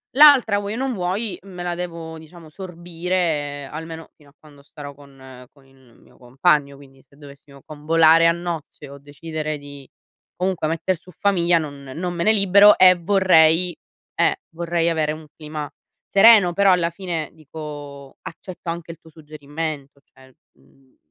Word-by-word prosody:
L'altra 270 -8 +6
vuoi 205 +1 -5
o - - -5
non 265 0 -2
vuoi 190 +2 -3
me 180 -3 -9
la 175 0 -3
devo, 165 -2 -7
diciamo, 160 0 -14
sorbire 170 -4 -4
almeno 160 +1 -8
fino 145 -2 -22
a - - -25
quando 145 -2 -18
starò 145 0 -11
con 135 -2 -15
con 140 -2 -25
il 130 -3 -24
mio - - -23
compagno. 140 +3 0
Quindi 135 -1 -18
se 140 +1 -26
dovessimo 140 -1 -16
convolare 160 +2 +3
a - - +5
nozze 170 -4 -6
o 140 - -11
decidere 155 +2 -6
di 145 -2 -12 0.5
comunque 180 -3 -2
metter 165 +4 -1
su 180 - -17
famiglia 175 -4 +2
non 145 -3 -6
non 175 +1 -4
me 170 -1 -3
ne 215 - +4
libero 200 0 +5
e 185 0 +7
vorrei 175 -2 +3 0.4
eh, - - +2
vorrei 170 0 -2
avere 155 -2 0
un 155 0 -8
clima 150 -2 -7 0.4
sereno. 200 -3 +6
Però 200 +2 +4
alla 175 -2 +2
fine 170 -3 -5
dico 145 -3 -10
accetto 180 +1 -9
anche 170 0 -6
il 165 - -12
tuo 165 - -18
suggerimento, 150 -2 -7
cioè, 130 0 -22 0.2
mhmm 130 - -29
160 Hz, 160 wpm, -21 LUFS, 145-180 Hz, 0.5 s, e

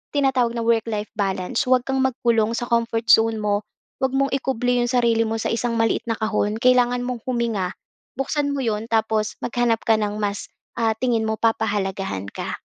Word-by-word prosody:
tinatawag 255 -4 +2
na 230 - -2
work-life 225 -2 0
balance. 190 0 -1
Huwag 255 -1 +4
kang 270 0 0
magkulong 235 -4 +1
sa 240 - -3
comfort 230 -1 0
zone 225 0 +5
mo. 205 0 0 0.4
Huwag 265 - +2
mong 275 0 +1
ikubli 250 -2 0
'yong 240 - -1
sarili 235 -2 +3
mo 225 - -2
sa - - -1
isang 230 0 -1
maliit 225 0 +1
na 225 - 0
kahon. 215 -1 -1
Kailangan 245 0 +3
mong 245 -2 -4
huminga, 230 -7 -1 0.4
buksan 285 +2 -1
mo 275 - -2
'yon, 220 -1 -2
tapos 220 -1 0
maghanap 235 -2 0
ka 220 -1 +3
ng 210 -1 -1
mas, 205 -1 -2 0.3
ah, 225 -1 +2
tingin 230 -2 0
mo 220 - 0
papahalagahan 200 - -1
ka. - - -5
230 Hz, 180 wpm, -22 LUFS, 215-245 Hz, 0.4 s, zone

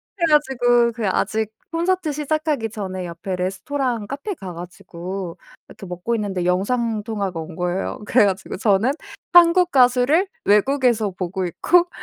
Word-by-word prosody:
그래 340 -4 +1
가지고 245 -5 +3
그게 225 -2 -3
아직 220 +3 0 0.2
콘서트 345 0 0
시작하기 300 -4 -1
전에 190 -4 -5
옆에 175 +3 -5
레스토랑 215 +5 -2
카페 285 - -4
가 190 - -8
가지고 175 +1 -7 0.3
이렇게 - - -11
먹고 180 +6 -3
있는데 200 -5 -2
영상 215 +5 0
통화가 200 -6 -3
온 160 +1 -7
거예요. 180 +2 -2
그래 230 0 +4
가지고 195 -1 -2
저는 210 +4 +2 0.4
한국 350 +1 +6
가수를 260 +7 +4 0.2
외국에서 225 0 +2
보고 185 +1 -3
있고 350 - +2
220 Hz, 335 characters per minute, -21 LUFS, 185-275 Hz, 0.4 s, 한국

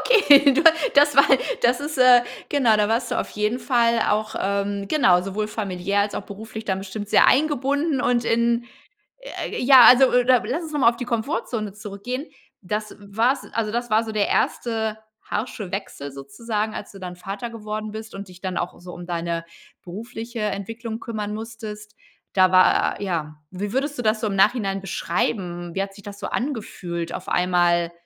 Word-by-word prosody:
Okay, 290 - +6
da 330 +3 +7 0.2
das 290 0 +5
war 275 - +8 0.4
das 240 +2 +3
ist, 290 -1 -5
äh 250 -1 +7 0.3
genau 250 -7 +3
da 210 -1 +1
warst 230 +2 0
du - - -1
auf - - -6
jeden 210 +4 -1
Fall 235 -3 +2
auch, 215 +1 0
ähm, 200 0 -2
genau, 185 -12 +4
sowohl 210 +2 -3
familiär 200 -2 -2
als 205 0 -1
auch - - -4
beruflich 220 +2 -9
dann 190 -2 -1
bestimmt 200 +2 -7
sehr - - +5
eingebunden 285 +1 +1
und 240 -1 +1
in, 235 +1 +1 0.9
j - - -4
ja 260 -3 +9
also 255 +1 +8
oder 250 -1 +3
lass 270 +10 -2
uns 310 - -8
noch 295 - -1
mal 230 - +6
auf 235 - -9
die 245 - -5
Komfortzone 230 - -3
zurückgehen. 215 +7 -6 0.4
Das 210 +3 -4
war's 225 +7 0
also 220 -2 -2
das 240 +1 -3
war 220 +1 +3
so 220 - -6
der 210 -1 +1
erste 220 -2 -1 0.2
harsche 210 -4 -5
Wechsel 145 -8 -6
sozusagen, 215 - -4
als - - -7
du 195 - -12
dann 180 -1 -7
Vater 195 +6 -6
geworden 215 -1 -5
bist 220 0 -8
und 195 0 -8
dich 180 -1 -15
dann 185 -2 -3
auch 175 - -5
so 180 0 -10
um 175 0 -9
deine 170 -1 -3 0.4
berufliche 225 +5 -7
Entwicklung 220 +2 -4
kümmern 210 -3 -5
musstest. 215 -1 -8 0.4
Da 185 -1 +5
war, 185 0 +4
ja 160 -6 -3
wie 200 +3 -5
würdest 280 +3 -1
du - - -2
das 215 -1 +1
so - - -1
im 195 -2 -2
Nachhinein 195 -2 +2
beschreiben? 175 -2 -3
Wie 195 - 0
hat 195 0 -6
sich 200 - -15
das 200 -1 -9
so - - -4
angefühlt, 180 - -4
auf - - -7
einmal, 175 -1 +2
215 Hz, 185 wpm, -23 LUFS, 195-240 Hz, 0.9 s, ja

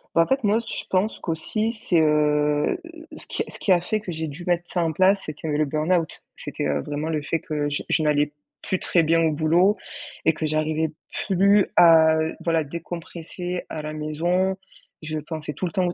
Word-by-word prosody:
Bah, 165 - +6
en - - +2
fait 265 -1 +1
moi 210 +2 +3
je - - -4
pense 195 +4 +1
qu'aussi 215 +7 -2
c'est, 200 -6 +1
heu 155 - +4
heu 150 -1 +2 0.2
heu 335 -1 -12
heu - - -10
ce - - -9
qui - - -2
ce - - -10
qui 195 - 0
a 175 - +5
fait 215 +5 -1
que 205 -4 -6
j'ai 160 -1 -3
dû 155 +4 -8
mettre 175 -1 0
ça 175 - +1
en 165 - 0
place, 190 +4 +3
c'est 155 - -5
qu'il 155 +2 -6
y 150 - -1
a - - +1
eu - - +1
le 155 - +2
burn-out. 160 +3 0
C'est - - -7
que, 75 0 -1
vraiment 150 +2 -3
le 155 -2 -1
fait 165 +3 -1
que 150 -4 -2
je 145 - -2
je 160 - +2
n'allais 150 -1 +2 0.3
plus 190 - -1
très 175 - +2
bien 165 +1 +3
au 160 -1 +3
boulot 165 +6 +3 0.5
et 160 - +5
que 155 - -3
j'arrivais 155 +1 0 0.3
plus 200 +1 +4
à 160 -2 +7 0.3
voilà, 165 -2 +1
décompresser 170 +3 -6
à 155 - -5
la 155 0 -5
maison, 170 +5 0 0.5
je 155 0 -4
pensais 155 0 -6
tout 165 +6 -4
le 170 - -3
temps 180 +2 +1
au 175 - -2
165 Hz, 235 wpm, -24 LUFS, 155-180 Hz, 0.5 s, à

